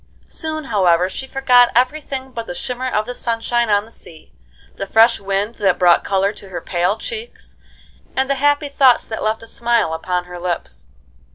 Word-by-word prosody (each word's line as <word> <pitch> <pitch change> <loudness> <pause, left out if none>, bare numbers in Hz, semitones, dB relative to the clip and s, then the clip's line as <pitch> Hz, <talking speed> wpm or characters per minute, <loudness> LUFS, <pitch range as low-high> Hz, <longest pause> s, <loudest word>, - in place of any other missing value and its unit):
Soon, 315 -1 -4
however, 185 -7 +2
she 265 +7 -6
forgot 250 -2 +4
every 255 +6 +2
thing 265 -2 -6
but 230 -2 -6
the 175 - -6
shimmer 255 +4 -3
of 215 -3 0
the 245 - -5
sunshine 235 0 -1
on 205 0 +2
the 225 - -17
sea, 160 -7 -14 0.4
the 195 - -4
fresh 225 +3 +4
wind 200 +3 -2
that 195 -3 +2
brought 175 -1 +4
color 195 +1 0
to 200 -2 -11
her 180 - -5
pale 180 +3 -1
cheeks, 465 -1 -7 0.6
and 265 0 +1
the 275 - +1
happy 290 0 +2
thoughts 270 -3 +4
that 220 - -6
left 220 +1 -1
a - - -12
smile 235 -8 0
upon 180 +2 -2
her 180 0 -9
lips. 175 - -5
225 Hz, 190 wpm, -19 LUFS, 190-260 Hz, 0.6 s, forgot